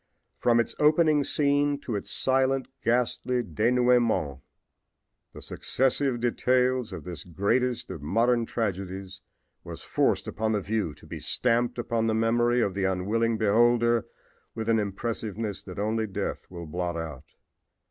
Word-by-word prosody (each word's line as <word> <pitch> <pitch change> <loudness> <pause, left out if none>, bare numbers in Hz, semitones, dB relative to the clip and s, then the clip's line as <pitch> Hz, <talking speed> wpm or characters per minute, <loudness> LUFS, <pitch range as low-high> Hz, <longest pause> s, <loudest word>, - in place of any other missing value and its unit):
From 120 -1 +3
its 115 - 0
opening 155 -1 +4
scene 145 0 +2
to 120 - -4
its 100 - -4
silent, 130 0 +1 0.2
ghastly 125 +1 +1
denouement 115 - +2 0.9
the - - -11
successive 130 -1 0
details 125 0 +1
of - - -7
this 85 -5 -7
greatest 105 +7 -1
of 80 -6 -7
modern 115 +9 +1
tragedies 95 -3 -4 0.4
was - - -9
forced - - +1
upon 110 +1 -1
the 105 - 0
view 100 -6 -2
to - - -17
be - - -7
stamped 120 0 +1
upon 115 -1 -1
the 110 - +1
memory 120 +2 +2
of 100 - 0
the 95 0 -2
unwilling 110 +5 0
beholder 120 +2 +3 0.5
with 110 -1 -4
an 115 -1 +4
impressiveness 105 0 -3
that 90 - -10
only 110 +2 -1
death 95 - -4
will 85 -2 -8
blot 85 +1 -3
out. 80 -5 -8
115 Hz, 140 wpm, -27 LUFS, 100-125 Hz, 0.9 s, opening